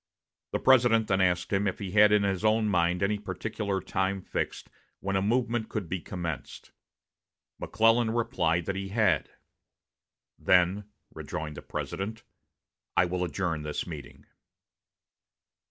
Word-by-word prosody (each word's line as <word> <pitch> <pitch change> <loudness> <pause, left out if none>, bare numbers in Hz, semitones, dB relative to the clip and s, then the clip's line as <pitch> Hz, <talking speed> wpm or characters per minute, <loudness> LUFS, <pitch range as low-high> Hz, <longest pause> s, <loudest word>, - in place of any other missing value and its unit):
The - - 0
President 120 -4 +4
then 95 -1 +2
asked 90 0 +1
him 100 +1 +2
if 95 - -2
he 100 -3 -5
had 105 +1 +6
in 105 -1 +4
his 95 -1 -1
own 110 0 +3
mind 90 -2 +1
any 105 +1 +1
particular 100 +1 -3
time 95 +1 -1
fixed - - -4 0.3
when 95 0 -2
a 95 - +2
movement 120 +1 0
could 100 -5 -4
be 95 +3 -3
commenced. 85 -3 -6 0.9
McClellan 115 +2 +3
replied 85 -7 0
that 100 - -2
he 95 0 -4
had. 100 -7 +2 1.1
"Then," 90 +3 +3 0.3
rejoined 75 -1 -5
the - - -7
President, 110 +3 -5 0.7
"I 90 - +5
will 90 +1 -2
adjourn 90 -3 -2
this 75 0 -3
meeting." 75 -7 -9
95 Hz, 140 wpm, -28 LUFS, 90-110 Hz, 1.1 s, had